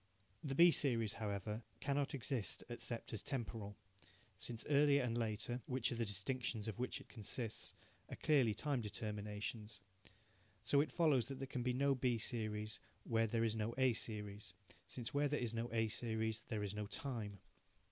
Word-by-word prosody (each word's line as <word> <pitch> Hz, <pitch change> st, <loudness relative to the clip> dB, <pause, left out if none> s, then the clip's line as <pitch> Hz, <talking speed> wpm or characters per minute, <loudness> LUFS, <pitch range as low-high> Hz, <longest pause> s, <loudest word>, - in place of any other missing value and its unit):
The 135 Hz, -2 st, -1 dB
B 170 Hz, +3 st, +9 dB
series, 115 Hz, -9 st, +2 dB
however, 105 Hz, +1 st, -2 dB, 0.2 s
cannot 140 Hz, +1 st, 0 dB
exist 125 Hz, -6 st, -2 dB
except 120 Hz, -1 st, -4 dB
as 110 Hz, -, -1 dB
temporal, 115 Hz, -6 st, -3 dB, 0.6 s
since 115 Hz, +3 st, -4 dB
earlier 145 Hz, -1 st, +5 dB
and 120 Hz, -2 st, 0 dB
later, 115 Hz, +2 st, -1 dB
which 130 Hz, -2 st, +1 dB
are -, -, -1 dB
the 115 Hz, -1 st, 0 dB
distinctions 110 Hz, +2 st, -1 dB
of 110 Hz, +1 st, -4 dB
which 125 Hz, -, -1 dB
it -, -, -13 dB
consists, 110 Hz, 0 st, -3 dB, 0.3 s
are -, -, -4 dB
clearly 130 Hz, -8 st, +4 dB
time 145 Hz, -4 st, 0 dB
determinations. 105 Hz, 0 st, -4 dB, 0.8 s
So 140 Hz, +5 st, +5 dB
it 155 Hz, -, -1 dB
follows 150 Hz, -8 st, +4 dB
that 135 Hz, -, -5 dB
there 135 Hz, -, -3 dB
can 130 Hz, -1 st, -3 dB
be 125 Hz, +1 st, +1 dB
no 140 Hz, +2 st, +4 dB
B 125 Hz, -2 st, +2 dB
series 110 Hz, -1 st, -2 dB, 0.2 s
where 115 Hz, -1 st, +2 dB
there 115 Hz, +1 st, +1 dB
is 110 Hz, -1 st, +2 dB
no 110 Hz, +1 st, -1 dB
A 130 Hz, -2 st, +5 dB
series, 105 Hz, -3 st, -4 dB, 0.3 s
since 120 Hz, -2 st, -4 dB
where 145 Hz, +1 st, +3 dB
there 150 Hz, +1 st, 0 dB
is 120 Hz, -2 st, -1 dB
no 115 Hz, +1 st, -2 dB
A 115 Hz, -1 st, +2 dB
series 110 Hz, 0 st, -1 dB
there 110 Hz, -4 st, -1 dB
is 100 Hz, -1 st, -2 dB
no 105 Hz, 0 st, -3 dB
time. 110 Hz, -3 st, -3 dB
115 Hz, 175 wpm, -40 LUFS, 105-130 Hz, 0.8 s, B